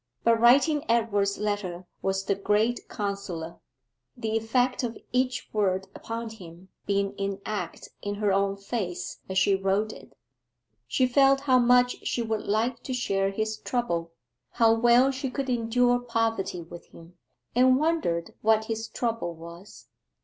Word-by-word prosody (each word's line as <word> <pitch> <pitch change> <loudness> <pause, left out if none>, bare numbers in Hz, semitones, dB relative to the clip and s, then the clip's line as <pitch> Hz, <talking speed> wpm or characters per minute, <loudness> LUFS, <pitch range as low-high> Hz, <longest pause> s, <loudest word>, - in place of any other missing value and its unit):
But 230 -1 +4
writing 280 +6 +5
Edward's 205 -4 +1
letter 205 -4 -3 0.2
was 195 0 -1
the 200 - +2
great 210 +4 0
consoler, 195 -5 -4 0.6
the 220 0 -2
effect 245 +3 +1
of 230 -2 -3
each 255 0 0
word 190 -3 0
upon 230 0 -6
him 180 -3 -13 0.2
being 200 0 0
enacted 195 -2 -4
in 205 0 -3
her 205 -1 +1
own 195 0 +1
face 195 -4 -4
as 190 - -2
she 195 +1 +4
wrote 195 +3 0
it. - - -15 0.7
She 255 - +2
felt 275 +2 +4
how 260 -3 +4
much 245 0 +4
she 240 - -1
would 220 -1 -3
like 230 +4 0
to 260 - -5
share 195 -5 0
his 215 +2 -2
trouble 170 -11 -2 0.4
how 230 -2 +5
well 240 +3 +5
she 265 0 -3
could 270 0 -3
endure 245 +1 +2
poverty 225 -6 -1
with 170 +1 -12
him 170 +1 -16 0.4
and 255 +1 +5
wondered 295 - 0
what 220 0 +3
his 225 0 -3
trouble 230 -8 -3
was. 170 +4 -12
220 Hz, 150 wpm, -27 LUFS, 195-245 Hz, 0.7 s, writing